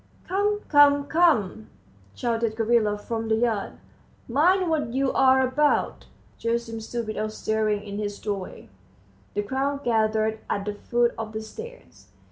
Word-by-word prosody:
"Come, 415 +2 0
come, 285 -1 +6
come," 285 - +2 0.5
shouted 230 -2 -1
Gavrila 225 -2 +2
from 225 +2 -4
the 220 - +2
yard, 220 -3 -1 0.5
"mind 355 +9 +3
what 295 -7 -1
you're 265 -1 +4
about." 285 +3 +1 0.3
Gerasim 230 -1 -2
stood 235 +1 -4
without 215 0 -3
stirring 215 -1 -1
in 200 0 -6
his 205 -1 -3
doorway. 200 -3 -5 0.7
The 205 - 0
crowd 275 +5 -2
gathered 220 -1 +1
at 200 - -1
the 210 - -2
foot 240 +3 0
of 220 -1 -5
the 220 - -4
stairs. 475 - -11
230 Hz, 135 wpm, -25 LUFS, 215-280 Hz, 0.7 s, come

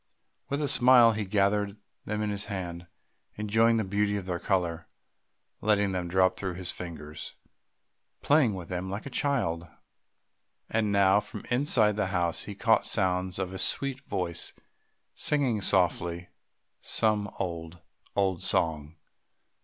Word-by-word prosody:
With 140 +2 -1
a - - +1
smile 125 -3 +6
he 110 -1 -2
gathered 100 +1 +1 0.3
them 105 0 -2
in 105 - -1
his 100 0 -3
hand, 90 -4 -5 0.5
enjoying 110 +2 +2
the 110 - +1
beauty 105 +1 0
of 95 - -5
their 90 -2 -3
colour, 85 -4 -1 0.7
letting 105 -2 +2
them 90 -2 -2
drop 95 +1 +3
through 95 -3 -3
his 90 -1 -2
fingers, 80 -3 -8 0.9
playing 140 -8 +3
with 90 -3 -7
them 90 +1 -4
like 100 +3 -5
a 140 - -7
child. 100 - -1 1.0
And 110 -2 +1
now 100 0 +5
from - - -8
inside 120 -5 +3
the 105 -3 0
house 90 -3 -1
he 105 - -7
caught 115 +3 +2
sounds 90 -2 0
of 95 -1 -3
a 95 - -5
sweet 135 +6 +1
voice 90 -10 -3 0.6
singing 130 -8 0
softly 85 -2 +1 0.5
some 105 -2 +1
old, 85 -2 -5 0.4
old 95 -3 +1
song. 80 -3 0
100 Hz, 140 wpm, -28 LUFS, 90-110 Hz, 1.0 s, smile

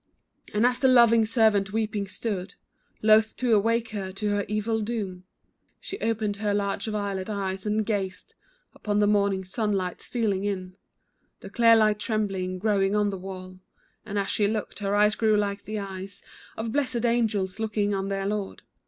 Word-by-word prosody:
And 210 +3 +2
as 250 0 +2
the 265 - +4
loving 235 -3 +6
servant 215 -3 +3
weeping 215 -2 -1
stood, 195 -2 -4 0.5
Loath 215 0 +4
to 245 -3 +1
awake 230 +2 +2
her 195 -3 -4
to 210 +2 -2
her 205 0 0
evil 215 +2 -1
doom, 205 -5 -4 0.5
She 390 - -7
opened 215 -2 -1
her 205 -1 0
large 200 +1 -1
violet 200 -2 -3
eyes, 195 -1 -3
and 215 +1 +1
gazed 195 -4 -3 0.4
Upon 205 -1 -2
the 210 - +4
morning 200 -2 +2
sunlight 190 -2 -2
stealing 210 -5 -1
in; 185 -2 -3 0.7
The - - -10
clear 230 -2 +6
light 215 -1 +3
trembling, 195 -4 -2
growing 200 0 +1
on 210 -1 +2
the 195 - -4
wall, 185 0 -8 0.4
And 205 -1 -5
as 200 -1 0
she 205 - +2
looked, 215 -1 -3
her 200 0 -1
eyes 210 +1 +4
grew 215 -1 +2
like 200 0 -2
the 215 0 -4
eyes 195 -1 -6 0.3
Of 220 0 -3
blessed 250 -3 0
angels 215 -5 0
looking 210 -2 0
on 195 0 -1
their 195 0 -2
Lord. 205 -1 -3
205 Hz, 170 wpm, -26 LUFS, 195-220 Hz, 0.7 s, loving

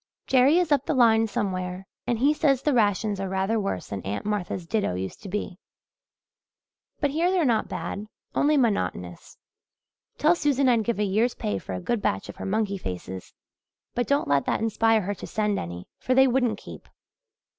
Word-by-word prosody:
Jerry 270 +5 +4
is 355 -3 +1
up 280 -2 +2
the 310 - +1
line 225 -3 +5
somewhere 185 -2 -3 0.2
and 240 - +1
he 280 +6 +3
says 275 -4 +2
the 295 - +2
rations 210 -3 +1
are 195 -1 -3
rather 190 +4 0
worse 195 - -3
than 100 -1 -4
Aunt 100 - -4
Martha's 200 -4 -2
ditto 200 - -1
used 95 +1 -5
to 200 - -8
be. 195 -1 -4 1.4
But 285 -2 +1
here 330 +5 +1
they're 365 -4 +2
not 230 -4 +2
bad 210 +2 -5 0.3
only 295 +1 +3
monotonous. 90 - -1 0.8
Tell 310 +3 +4
Susan 280 -5 +1
I'd 235 -3 +3
give 235 -3 0
a 210 - +1
year's 215 +5 +1
pay 100 -2 -2
for 95 - -7
a 90 - -3
good 235 - -1
batch 95 - -1
of - - -9
her - - -5
monkey 200 -1 0
faces; 95 - -7 0.6
but 245 -1 -1
don't 280 +1 +1
let 140 -1 +2
that - - +1
inspire 225 0 +2
her 200 +2 -2
to 195 - -9
send 210 -2 0
any 85 +1 -7
for 255 - 0
they 265 0 +6
wouldn't 250 -2 +1
keep. - - -12
215 Hz, 190 wpm, -25 LUFS, 185-255 Hz, 1.4 s, they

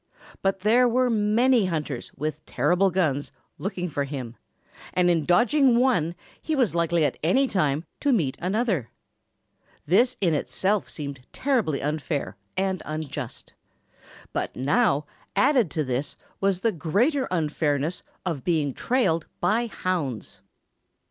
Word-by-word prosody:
But 195 -1 0
there 240 +4 +4
were 250 +1 +2
many 225 +1 +3
hunters 150 -7 -3
with 155 +2 -4
terrible 175 +9 +2
guns 155 -6 0 0.3
looking 190 -2 -3
for 145 -3 -2
him, 130 -4 -6 0.6
and 180 -1 +4
in 165 -3 +1
dodging 245 - +4
one 205 -11 +2 0.3
he 315 - -1
was 250 - +2
likely 170 -1 +2
at - - -2
any 260 - +3
time 155 - 0
to 285 - +2
meet 155 - +1
another. 190 - 0 1.0
This 235 - +3
in 175 -5 +2
itself 195 +6 0
seemed 140 -4 -6
terribly 235 - 0
unfair 150 - -2 0.2
and 190 -1 0
unjust. 155 -1 -6 0.8
But - - -2
now, 150 - +2 0.3
added 260 - +4
to 155 +2 -1
this 130 +1 -2 0.2
was 195 -2 +1
the 230 - +2
greater 215 - +1
unfairness 155 -2 0 0.2
of 165 -7 -2
being 155 -6 +1
trailed 170 - +1
by 235 +3 +1
hounds. 140 - -3
175 Hz, 130 wpm, -25 LUFS, 150-225 Hz, 1.0 s, there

